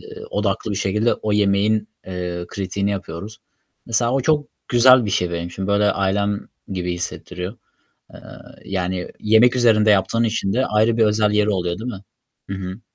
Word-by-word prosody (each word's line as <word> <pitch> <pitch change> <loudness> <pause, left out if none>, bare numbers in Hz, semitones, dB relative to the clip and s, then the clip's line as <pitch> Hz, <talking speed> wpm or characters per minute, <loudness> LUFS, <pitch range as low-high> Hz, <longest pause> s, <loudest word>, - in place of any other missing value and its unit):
eee, 440 0 -11
odaklı 115 - -1
bir 100 - -2
şekilde 105 +5 +1
o 105 - -3
yemeğin, 105 +1 +2 0.2
eee, 90 -1 -4
kritiğini 100 +1 -2
yapıyoruz. 100 +2 -6 0.5
Mesela 120 +1 +1
o 135 - +2
çok 150 +2 +1 0.2
güzel 125 0 +6
bir 105 - -2
şey 90 -2 0
benim 85 0 -3
için. 95 +2 -5
Böyle 100 +1 +3
ailem 100 +1 0 0.3
gibi 90 -2 -3
hissettiriyor. 90 +3 -6 0.6
Eee, - - -11 0.5
yani, 90 -1 -3
yemek 110 +4 +4
üzerinde 110 -3 +4
yaptığın 105 +4 +2
için 110 -3 -1
de 130 +5 +1
ayrı 110 +2 +2
bir 115 - +4
özel 105 0 +2
yeri 105 0 +2
oluyor, 90 -2 -1
değil 120 +3 -4
mi? 100 - -8 0.5
Hı - - -2
hı. 95 +2 -6
105 Hz, 170 wpm, -21 LUFS, 95-110 Hz, 0.6 s, güzel